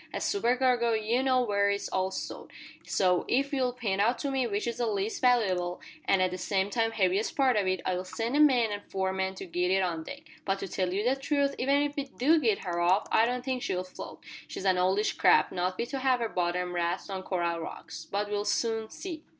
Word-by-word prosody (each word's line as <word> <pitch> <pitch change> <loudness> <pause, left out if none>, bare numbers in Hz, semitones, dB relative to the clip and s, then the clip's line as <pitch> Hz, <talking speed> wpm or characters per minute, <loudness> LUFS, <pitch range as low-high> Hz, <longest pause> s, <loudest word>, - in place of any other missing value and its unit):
As - - -3
supercargo, 250 - +2
you 220 +3 +1
know 260 -1 +3
where 200 -3 +2
it's 200 0 -1
all 190 0 0
stowed, 190 - -6 0.4
so, 180 -2 +2
if 275 +3 +1
you'll 255 -2 +1
pint 215 -6 -1
out 235 +4 +2
to 280 - -3
me 265 -2 0
which 205 -1 -2
is 235 -1 -3
the 240 - +1
least 205 0 -2
valooable, 190 -8 +2 0.3
an' 195 - +3
at 185 -1 +2
the 185 - -5
same 195 +1 0
time 225 0 +1
heaviest 200 -1 0
part 265 -3 +4
of 205 -3 +1
it, 185 -1 0
I'll 185 0 -1
send 225 +6 -3
the 290 - +2
mate 250 -7 +5
and 205 0 -4
four 190 -1 -1
men 190 0 -2
to - - -7
git 180 0 -1
it 190 +1 +3
on 165 -3 -2
deck. 280 - -9 0.2
But 195 0 0
to 195 - -5
tell 185 -1 -1
you 205 +5 0
the 260 - +3
truth 280 0 0
even 280 +3 +3
if 290 0 -3
we 280 - -2
do 285 +4 +2
git 225 -8 +1
her 175 -1 -2
off 180 +3 +3
I 225 +1 +4
don't 250 +1 -3
think 260 -2 -1
she'll 185 -5 -2
float. 185 - -10 0.3
She's 195 - -7
an 185 -1 +3
oldish 190 +4 +2
craft, 180 - +5
not 185 +1 -2
fit 235 - -3
to 275 - -3
have 260 -1 +2
her 230 -1 -1
bottom 180 0 -1
rasped 175 +3 -2
on 190 -1 -3
coral 170 -3 -1
rocks. 165 0 -8
But 205 +1 -1
we'll 205 0 -2
soon 225 +1 0
see." 335 -5 -7
205 Hz, 240 wpm, -29 LUFS, 185-250 Hz, 0.4 s, mate